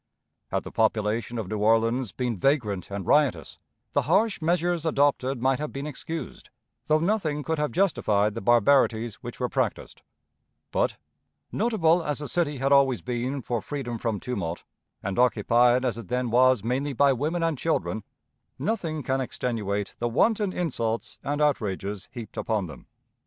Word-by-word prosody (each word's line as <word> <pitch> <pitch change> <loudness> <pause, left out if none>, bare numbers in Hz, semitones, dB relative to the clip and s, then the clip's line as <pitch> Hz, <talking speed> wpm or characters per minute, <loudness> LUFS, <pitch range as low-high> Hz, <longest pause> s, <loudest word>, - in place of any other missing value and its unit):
Had - - -1
the - - -8
population 110 +2 0
of 110 -5 -3
New 105 +2 -3
Orleans 115 +2 +2
been 125 0 -2
vagrant 105 - 0
and 100 -2 -5
riotous, 135 - +2 0.3
the - - +3
harsh 220 -5 +2
measures 175 0 +1
adopted 140 -4 +1
might 130 +1 +1
have 150 0 -4
been 140 +1 -5
excused, 160 +3 -6 0.4
though 155 - +4
nothing 160 -4 0
could 160 0 -1
have 150 0 0
justified 110 - +2
the 115 - -5
barbarities 120 0 +3
which - - -8
were - - 0
practiced; - - -2 0.7
but, - - 0 0.5
notable 180 -7 +2
as 150 -3 -1
the 145 - -4
city 150 -4 0
had 135 +2 0
always 135 -3 +4
been 125 +2 -2
for 120 -2 -2
freedom 120 -2 -4
from 110 -3 -1
tumult, 90 -9 -4 0.4
and 100 +3 -2
occupied 120 +1 +4
as 120 -2 -1
it 110 - -9
then 125 +1 -1
was 130 -2 +4
mainly 135 +5 -1
by 140 +2 +4
women 155 +7 -1
and 165 -5 0
children, 110 - -1 0.5
nothing 165 -9 -2
can 130 +2 0
extenuate 105 -6 -3
the 120 - 0
wanton 205 - +2
insults 115 -11 -2
and 145 +2 0
outrages 105 -8 -1
heaped 120 -4 -9
upon 110 -4 -1
them. 80 - -11
125 Hz, 160 wpm, -26 LUFS, 110-150 Hz, 0.7 s, though